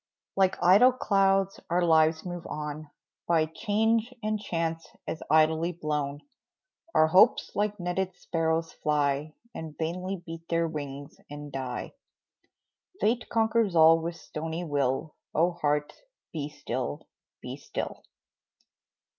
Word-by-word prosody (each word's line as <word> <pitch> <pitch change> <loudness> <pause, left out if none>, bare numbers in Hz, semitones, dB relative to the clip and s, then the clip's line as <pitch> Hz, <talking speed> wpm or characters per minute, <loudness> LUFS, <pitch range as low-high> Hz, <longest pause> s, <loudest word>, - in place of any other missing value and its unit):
Like 190 -1 +3
idle 205 +9 +7
clouds 195 -4 +2
our 175 +1 +2
lives 160 -1 +4
move 175 -1 -6
on, 150 0 -5 0.4
By 165 -2 +3
change 220 +7 0
and 215 0 0
chance 165 -4 -2 0.2
as 160 - -4
idly 160 +2 +3
blown; 150 -3 -2 0.7
Our 155 - +6
hopes 185 +4 +5
like 210 0 -1
netted 180 +1 -2
sparrows 165 -1 -1
fly, 150 0 0 0.2
And 160 -2 -7
vainly 180 +3 -3
beat 165 0 -9
their 165 0 +1
wings 145 -2 -7
and 145 0 -8
die. 130 -2 -4 1.1
Fate 235 +3 +1
conquers 225 -4 +2
all 165 0 +7
with 165 +1 -4
stony 160 +1 -5
will, 145 -1 -1 0.2
Oh, 170 +3 +3
heart, 150 -3 -1 0.4
be 150 -2 -3
still 130 - -4 0.3
be - - -6
still! - - -5
165 Hz, 120 wpm, -28 LUFS, 150-185 Hz, 1.1 s, idle